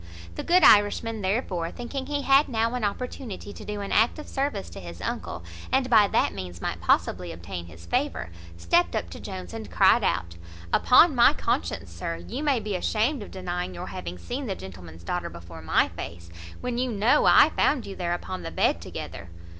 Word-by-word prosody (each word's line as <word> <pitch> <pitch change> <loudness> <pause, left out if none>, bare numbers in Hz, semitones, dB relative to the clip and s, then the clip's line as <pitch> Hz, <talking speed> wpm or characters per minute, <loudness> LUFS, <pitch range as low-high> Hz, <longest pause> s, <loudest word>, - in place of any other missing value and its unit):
The - - -5
good 360 +1 +4
Irishman, 215 +2 +5
therefore, 190 -4 -1
thinking 260 +5 -6
he 290 -1 -2
had 275 +2 +5
now 230 -1 0
an 250 -2 -2
opportunity 210 -1 -4
to - - -10
do 210 -1 -5
an 200 - -5
act 225 +7 +3
of 305 - -8
service 270 -8 -2
to - - -8
his 85 -1 -9
uncle, 85 0 -4 0.3
and 260 -1 +1
by 215 -3 +7
that - - +1
means 90 -2 -7
might - - -4
possibly 90 -1 +1
obtain 85 +1 -7
his 85 +1 -13
favour, 85 -1 -1 0.3
stept 85 0 +2
up - - -3
to - - -8
Jones, 90 -2 -7
and - - -7
cried - - +4
out, 85 -1 -1 0.4
"Upon - - +6
my - - +6
conscience, 85 - -2
sir, 85 0 -4
you 85 - -6
may 285 -5 +2
be 210 -2 -3
ashamed 225 +9 0
of 205 - -8
denying 180 - -4
your 90 - -6
having 90 -1 -6
seen 255 - -5
the 195 - -2
gentleman's 85 - -11
daughter 175 - -3
before 85 -1 -11
my 80 - +2
face, 85 0 -8 0.3
when 245 -1 -2
you 255 -1 0
know 225 +7 +3
I - - +7
found 270 -5 +1
you 195 - -7
there 175 -1 -1
upon 185 +1 -6
the - - -5
bed - - +1
together." - - -7
190 Hz, 200 wpm, -26 LUFS, -, 0.4 s, by